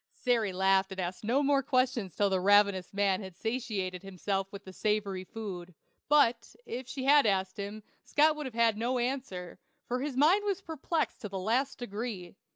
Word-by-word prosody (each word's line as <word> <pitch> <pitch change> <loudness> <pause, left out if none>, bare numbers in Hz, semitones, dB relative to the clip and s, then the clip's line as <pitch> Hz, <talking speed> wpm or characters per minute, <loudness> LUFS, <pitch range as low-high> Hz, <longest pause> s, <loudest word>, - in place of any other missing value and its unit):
Sary 230 -5 +1
laughed 190 +1 +2
and 190 - -6
asked 180 +2 -4
no 250 +7 +2
more 280 0 +3
questions 255 - 0
till 200 -1 +2
the 190 - +2
ravenous 200 -1 +4
man 200 -1 +1
had 190 -3 -9
satisfied 210 -6 -3
himself 195 0 -3
with 200 0 -9
the 190 - -10
savory 205 -2 -1
food; 185 -5 -7 0.3
but, 245 -6 +3
if 250 +2 -6
she 260 0 -5
had 280 -2 +6
asked 190 -2 0
them, 205 +1 -6 0.2
Scott 305 +1 +3
would 300 -2 -4
have 245 - -9
had 230 -2 +3
no 245 +3 0
answer, 240 -8 -3 0.3
for 250 +1 -2
his 275 -2 -3
mind 340 +9 +5
was 400 -2 -1
perplexed 325 -2 -3
to 210 - -5
the 195 - -5
last 235 +8 0
degree. 205 -6 -5
215 Hz, 185 wpm, -30 LUFS, 190-260 Hz, 0.3 s, had